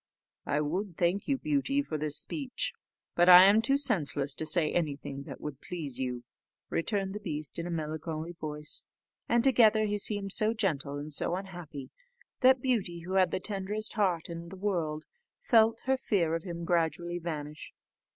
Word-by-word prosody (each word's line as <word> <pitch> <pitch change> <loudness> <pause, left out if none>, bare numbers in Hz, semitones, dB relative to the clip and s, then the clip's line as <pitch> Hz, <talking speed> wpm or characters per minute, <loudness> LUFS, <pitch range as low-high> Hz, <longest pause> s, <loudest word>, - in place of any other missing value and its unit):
"I 150 - +1
would 175 +4 -3
thank 180 +4 0
you, 275 - +1
Beauty, 285 -1 0
for 160 - -5
this 150 -1 -1
speech, 275 -5 -1 0.4
but 175 +1 +4
I 180 0 +11
am 205 +3 +6
too 275 +4 +2
senseless 145 - +1
to 155 +3 -2
say 155 -1 +2
anything 140 -4 -3
that 135 - -8
would 145 -2 -7
please 155 -8 -5
you," 125 -2 -3 0.5
returned 195 +2 -1
the 210 - -5
beast 155 -6 -4
in 170 - -3
a - - -5
melancholy 160 0 -4
voice; 150 -3 -2 0.4
and 235 -1 +3
altogether 220 -5 +5
he 210 0 -1
seemed 200 -1 0
so 215 +3 +1
gentle 145 -9 -1
and 145 +1 -3
so 170 - 0
unhappy, 175 -7 -8 0.5
that 260 -1 +5
Beauty, 200 -10 0
who 180 +3 -6
had 190 -1 +4
the - - -2
tenderest 210 +2 -2
heart 185 -7 0
in 170 0 -7
the 190 - -9
world, 170 -6 -2 0.3
felt 225 -1 +3
her 265 0 +1
fear 185 -10 0
of 165 - -1
him 170 -1 -6
gradually 170 +1 0
vanish. 150 -3 -6
175 Hz, 175 wpm, -30 LUFS, 155-210 Hz, 0.5 s, I